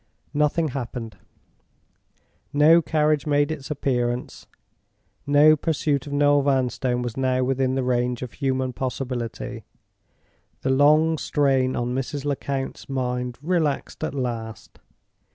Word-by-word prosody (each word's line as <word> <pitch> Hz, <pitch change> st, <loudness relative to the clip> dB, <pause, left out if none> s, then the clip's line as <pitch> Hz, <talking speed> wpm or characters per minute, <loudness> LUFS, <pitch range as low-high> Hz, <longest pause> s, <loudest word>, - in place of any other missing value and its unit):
Nothing 150 Hz, +2 st, +1 dB
happened; 120 Hz, -5 st, -6 dB, 1.3 s
no 155 Hz, +4 st, +6 dB
carriage 150 Hz, -1 st, +1 dB
made 145 Hz, 0 st, +2 dB
its 145 Hz, -4 st, -6 dB
appearance; 125 Hz, -4 st, -2 dB, 0.8 s
no 145 Hz, +2 st, +6 dB
pursuit 145 Hz, -2 st, -1 dB
of -, -, -7 dB
Noel 145 Hz, 0 st, +4 dB
Vanstone 130 Hz, -2 st, 0 dB
was 120 Hz, -2 st, -4 dB
now 130 Hz, -1 st, +1 dB
within 130 Hz, 0 st, 0 dB
the 135 Hz, -, 0 dB
range 125 Hz, 0 st, 0 dB
of 125 Hz, -, -6 dB
human 130 Hz, -2 st, -1 dB
possibility. 125 Hz, -2 st, -4 dB, 1.0 s
The 130 Hz, -, +1 dB
long 155 Hz, +3 st, +4 dB
strain 135 Hz, -3 st, +1 dB
on 120 Hz, +1 st, -2 dB
Mrs. 135 Hz, +2 st, -3 dB
Lecount's 140 Hz, -2 st, -3 dB
mind 125 Hz, -2 st, -2 dB
relaxed 160 Hz, -4 st, -1 dB
at -, -, -3 dB
last. 115 Hz, -4 st, -5 dB
135 Hz, 115 wpm, -24 LUFS, 125-145 Hz, 1.3 s, no